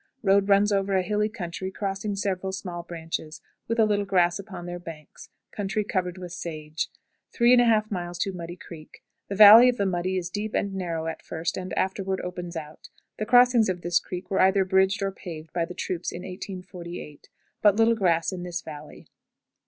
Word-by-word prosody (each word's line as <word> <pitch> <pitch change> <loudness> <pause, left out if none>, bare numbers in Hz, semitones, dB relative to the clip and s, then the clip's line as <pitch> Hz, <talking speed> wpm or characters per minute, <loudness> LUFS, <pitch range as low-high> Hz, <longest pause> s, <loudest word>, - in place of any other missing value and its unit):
Road 200 0 +3
runs 200 +1 +4
over 195 -1 +1
a 185 - +2
hilly 210 +3 0
country, 185 -3 -5
crossing 195 +1 -3
several 190 -1 -2
small 180 -2 -5
branches, 165 -2 -6 0.3
with 230 - -1
a 220 - +6
little 205 -1 +1
grass 180 -2 +2
upon 190 -3 -8
their 175 0 -5
banks; 160 -3 -11 0.2
country 205 +1 -2
covered 185 -3 -2
with 180 -2 -8
sage. 155 -3 -4 0.5
3 240 +1 +6
1/2. 205 -6 +1
Muddy 175 -1 -7
Creek. 165 -3 -13 0.2
The 200 - -4
valley 215 +4 +10
of 250 - -1
the 200 - 0
"Muddy" 185 0 -1
is 180 -1 -4
deep 210 +2 -3
and 200 -1 -1
narrow 170 -4 -3
at 165 0 -4
first, 165 +1 -4
and 185 -1 -6
afterward 190 0 -1
opens 180 -1 -6
out. 155 -1 -9 0.3
The 215 - -2
crossings 245 -2 +5
of 180 -2 -2
this 175 0 +2
creek 180 +1 -8
were 190 - +2
either 190 0 +4
bridged 190 +1 +2
or 195 - 0
paved 165 -4 -9
by 170 -1 0
the 180 +1 -9
troops 180 -1 -3
in 175 - -7
1858. 180 -5 -8 0.3
But 205 -2 +5
little 225 +1 +4
grass 175 -6 +1
in 185 -1 -5
this 175 -1 -5
valley. 150 -1 -10
185 Hz, 185 wpm, -26 LUFS, 175-200 Hz, 0.5 s, valley